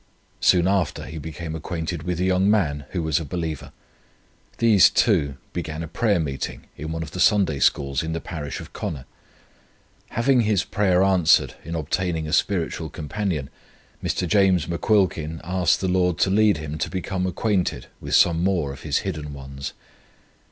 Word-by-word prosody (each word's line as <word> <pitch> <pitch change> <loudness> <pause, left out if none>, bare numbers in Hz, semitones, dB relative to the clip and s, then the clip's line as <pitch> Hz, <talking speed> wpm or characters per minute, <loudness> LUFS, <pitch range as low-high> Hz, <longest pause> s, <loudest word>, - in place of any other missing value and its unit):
Soon 90 -1 +4
after 95 -2 0
he 80 - -7
became 80 +1 -6
acquainted 80 0 -4
with 90 +1 -3
a - - +1
young 95 +1 +3
man 75 -9 +1
who 90 -3 -2
was 80 -2 +1
a - - -4
believer. 80 -1 -4 0.9
These 105 -5 +6
two 80 - +2 0.2
began 80 -2 -4
a - - -5
prayer 105 +2 +1
meeting 70 -4 -4
in 80 +2 -6
one 80 0 -3
of 75 - -9
the 90 - -6
Sunday 90 -6 +3
Schools 70 -1 +2
in 80 - -4
the 80 - -2
parish 75 -4 -6
of - - -11
Connor. 70 -4 -5 1.0
Having 125 +2 +2
his 105 -4 +2
prayer 95 -3 +2
answered 90 -4 +4
in 85 - -5
obtaining 80 +1 -1
a 75 - -4
spiritual 85 -4 0
companion, 80 -3 -3 0.5
Mr. 90 - -1
James 95 -4 +3
McQuilkin 85 -3 0
asked 90 +1 +1
the 95 - 0
Lord 90 -2 +2
to 95 - +2
lead 105 -2 +4
him 75 0 -6
to - - -1
become 95 0 -2
acquainted 95 0 -1
with - - -1
some 85 0 +4
more 85 -8 0
of 70 - -11
His 75 -3 -1
hidden 75 -2 -4
ones. 70 0 -7
85 Hz, 170 wpm, -23 LUFS, 75-95 Hz, 1.0 s, These